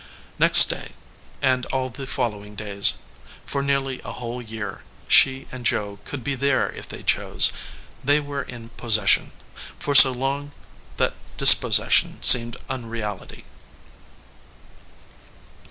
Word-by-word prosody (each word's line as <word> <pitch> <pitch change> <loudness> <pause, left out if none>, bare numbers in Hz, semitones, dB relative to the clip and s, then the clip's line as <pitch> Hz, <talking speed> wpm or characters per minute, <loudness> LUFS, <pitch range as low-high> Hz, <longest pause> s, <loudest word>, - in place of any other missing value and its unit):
Next - - +8
day, - - -9 0.5
and 130 -2 -2
all 130 -1 -6
the 135 +2 -10
following 105 -6 -7
days, 100 -1 +2 0.5
for 140 - -6
nearly 135 -2 -5
a - - -10
whole 120 0 -10
year, 110 -4 -11 0.3
she 135 0 +1
and 130 -1 -11
Joe 105 -3 -4
could 140 -4 -10
be 140 - -5
there 135 +1 -3
if - - -14
they - - -12
chose. - - +2 0.5
They 145 +3 0
were 145 -1 -8
in 115 -2 -13
possession; 110 -3 -2 0.5
for 145 - -6
so 135 -1 +10
long 140 +3 -7 0.4
that - - -3 0.2
dispossession - - +5
seemed 120 -1 +5
unreality. 115 -6 -10
125 Hz, 120 wpm, -19 LUFS, 110-135 Hz, 0.5 s, so